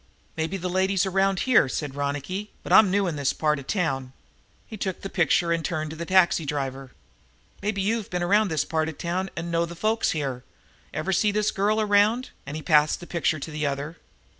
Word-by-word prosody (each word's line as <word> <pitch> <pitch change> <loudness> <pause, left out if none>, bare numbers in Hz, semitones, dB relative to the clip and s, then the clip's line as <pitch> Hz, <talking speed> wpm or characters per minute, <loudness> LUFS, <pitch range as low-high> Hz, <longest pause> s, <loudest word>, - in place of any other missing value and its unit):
"Maybe 160 +4 -2
the 180 0 -4
lady's 190 +1 +1
around 195 0 +1
here," 255 - +4
said 145 0 -3
Ronicky, 145 +9 -3
"but - - -2
I'm 215 -3 +8
new 200 +1 +2
in 165 -4 -2
this 140 -2 0
part 150 -1 0
of 135 - -11
town." 135 -10 -1 0.5
He 220 - -9
took 190 -3 -4
the 195 - -5
picture 170 0 +2
and 165 -1 0
turned 155 -2 -2
to - - -7
the 170 +1 -6
taxi 185 -3 +4
driver. 135 -2 -4 0.7
"Maybe 200 -1 -1
you've 220 +1 -1
been 180 -1 -2
around 205 +4 +3
this 155 -5 0
part 160 -1 -1
of 160 - -9
town 185 +3 -2
and 170 0 -4
know 170 0 +1
the 170 - -9
folks 220 +5 +1
here. 135 -5 -2 0.5
Ever 185 +5 -2
see 210 +4 +3
this 210 0 +1
girl 210 +3 +1
around?" 215 +4 +2 0.2
And 145 - -5
he 155 - -6
passed 150 -2 +3
the 175 - -9
picture 170 -2 0
to 155 +2 -7
the 150 -1 -1
other. 140 +4 -4
170 Hz, 215 wpm, -25 LUFS, 150-195 Hz, 0.7 s, I'm